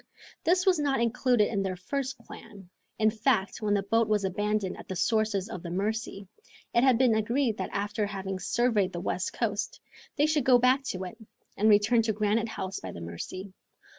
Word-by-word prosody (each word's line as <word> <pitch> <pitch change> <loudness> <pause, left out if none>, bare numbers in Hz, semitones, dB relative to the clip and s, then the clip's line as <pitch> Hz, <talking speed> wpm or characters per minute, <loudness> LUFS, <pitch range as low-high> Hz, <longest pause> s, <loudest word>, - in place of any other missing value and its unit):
This 360 +2 +2
was 370 -4 +4
not 280 -3 +1
included 235 -1 +2
in 200 -3 -1
their 190 -1 -2
first 265 +8 -4
plan. 195 -4 -13 0.3
In 220 -1 +3
fact, 220 -3 0
when 205 -1 +1
the 200 - 0
boat 225 +3 +2
was 210 -2 +1
abandoned 205 0 -1
at - - -11
the 190 - -4
sources 215 0 +1
of 225 -6 -7
the 170 - -7
Mercy, 200 +1 -3 0.5
it 235 - +4
had 260 -3 +5
been 250 -2 +4
agreed 230 +2 +1
that - - -3
after 205 +1 -2
having 195 -1 -4
surveyed 210 -1 +1
the 175 - -3
west 180 +1 -2
coast, 210 -2 -2 0.4
they 295 - +3
should 305 -2 +1
go 250 0 +6
back 255 +3 +3
to 185 -5 -3
it, 185 +5 -8 0.4
and 215 +2 +3
return 210 +3 +5
to 220 -1 0
Granite 215 +2 0
House 190 -3 -4
by 95 - -7
the 85 - -9
Mercy. 85 - -7
215 Hz, 195 wpm, -28 LUFS, 195-235 Hz, 0.5 s, go